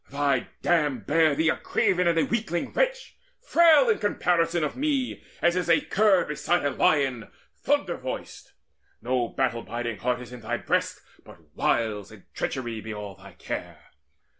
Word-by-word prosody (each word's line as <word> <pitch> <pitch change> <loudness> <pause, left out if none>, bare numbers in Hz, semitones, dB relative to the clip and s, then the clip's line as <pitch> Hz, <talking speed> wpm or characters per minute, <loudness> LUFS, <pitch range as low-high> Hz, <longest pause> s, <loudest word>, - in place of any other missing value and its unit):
Thy 140 -2 0 0.2
dam 150 -8 +1
Bare 155 +6 +2
thee 160 +2 +2
a - - +2
craven 180 -1 +1
and 170 -1 +2
a 165 - +3
weakling 215 -7 -2
wretch - - -1 0.2
Frail 340 -1 +5
in 455 - +2
comparison 175 -4 +1
of 150 - -2
me, 275 -3 -1 0.2
as 170 0 +4
is 180 -2 -1
A 165 - +5
cur 200 -3 +3
beside 150 +2 -1
a 145 - +1
lion 135 -7 +1 0.3
thunder - - 0
voiced! - - -7 0.5
No 125 -1 -1
battle 125 -1 -1
biding 115 -4 -5
heart 125 +4 -1
is 125 0 -10
in 125 - -9
thy 120 +2 -2
breast, - - -1 0.2
But - - -18
wiles 105 -3 0
and 105 -3 -14
treachery 120 -4 -3
be 110 - -7
all 105 -2 -6
thy - - -15
care. - - -7
150 Hz, 165 wpm, -26 LUFS, 120-180 Hz, 0.5 s, Frail